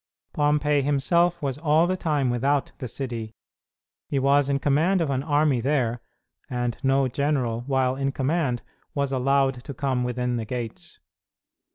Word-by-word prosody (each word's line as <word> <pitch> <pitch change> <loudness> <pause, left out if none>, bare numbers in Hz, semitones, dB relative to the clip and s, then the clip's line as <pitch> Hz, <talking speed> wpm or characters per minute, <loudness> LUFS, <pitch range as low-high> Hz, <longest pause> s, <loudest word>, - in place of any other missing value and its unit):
Pompey 150 0 +2
himself 155 +5 +1
was 135 0 -2
all 155 +1 +3
the 185 +1 0
time 150 -8 0
without 135 +3 0
the 130 - -4
city. 115 -3 -5 0.7
He 140 - -1
was 140 +1 +3
in 140 - +2
command 155 +7 +2
of 160 -4 0
an 130 -1 0
army 145 -2 +2
there, 125 -3 0 0.5
and 120 -2 -2
no 135 0 +2
general, 130 -3 -1
while 130 -2 +1
in 135 0 -1
command, 135 -2 -1 0.3
was 140 -1 0
allowed 135 -1 +1
to 140 - -7
come 130 -1 0
within 125 0 -1
the 115 - -3
gates. 120 -1 -6
135 Hz, 155 wpm, -25 LUFS, 125-145 Hz, 0.7 s, all